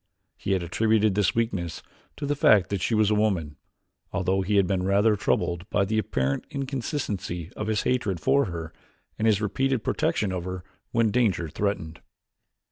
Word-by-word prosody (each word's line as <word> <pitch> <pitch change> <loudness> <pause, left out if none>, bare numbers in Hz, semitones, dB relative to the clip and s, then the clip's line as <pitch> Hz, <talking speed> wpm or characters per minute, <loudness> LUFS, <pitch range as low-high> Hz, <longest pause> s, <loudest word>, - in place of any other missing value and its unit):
He 100 - -2
had 95 -2 0
attributed 110 +3 +2
this 95 -4 +1
weakness 95 -8 -2 0.3
to 145 - -4
the 145 +1 0
fact 100 -9 +4
that 100 -2 -1
she 115 - +1
was 110 -1 +3
a - - +4
woman, 95 -8 0 0.6
although 95 0 0
he 100 +2 0
had 100 -1 +5
been 95 -1 0
rather 100 +3 +3
troubled 85 -3 -1
by 100 - +2
the 110 +2 0
apparent 70 -8 -1
inconsistency 115 - -3
of 110 - -4
his 110 -1 0
hatred 105 -8 0
for 140 - +3
her 85 -3 -6 0.5
and 110 - +2
his 110 -1 +3
repeated 130 +5 0
protection 100 -3 0
of 90 -2 -3
her 90 0 -5 0.3
when 115 -2 +2
danger 100 -8 +1
threatened. 80 -4 -3
100 Hz, 175 wpm, -26 LUFS, 90-110 Hz, 0.6 s, had